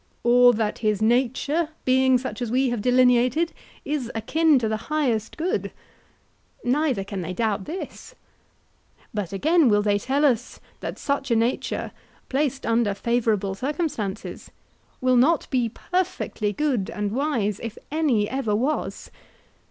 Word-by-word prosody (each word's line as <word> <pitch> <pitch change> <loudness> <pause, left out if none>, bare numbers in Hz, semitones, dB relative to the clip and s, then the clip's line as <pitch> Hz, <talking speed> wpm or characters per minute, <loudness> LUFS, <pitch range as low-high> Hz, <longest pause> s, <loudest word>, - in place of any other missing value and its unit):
Or 245 +1 +6
that 215 -2 -1
his 215 -3 +1
nature, 260 +8 +1 0.2
being 260 0 +4
such 245 -2 -6
as 240 - -2
we 260 +2 +2
have 240 -3 -2
delineated, 250 +6 +3 0.3
is 280 -5 -2
akin 310 +6 +3
to 235 -3 0
the 220 +4 -4
highest 250 -8 0
good? 345 +4 -1 0.9
Neither 260 -4 +1
can 195 -1 -5
they 180 +1 -4
doubt 210 -1 -1
this. 365 +4 -7 1.0
But 205 -5 -3
again, 305 - +3
will 205 -1 +3
they 205 -1 +2
tell 275 +7 +1
us 250 -3 0 0.2
that - - -5
such 280 -1 -2
a 235 - +3
nature, 230 +3 -1 0.4
placed 275 0 -1
under 230 -3 +1
favourable 220 -3 0
circumstances, 250 - -4 0.5
will 255 -1 +3
not 295 +7 +3
be 245 -4 +1
perfectly 350 - -2
good 255 -5 -1
and 205 -1 -3
wise 235 -6 -1
if 230 -2 -6
any 280 -10 +2
ever 255 -5 -1
was? 265 +8 -2
245 Hz, 140 wpm, -24 LUFS, 215-280 Hz, 1.0 s, Or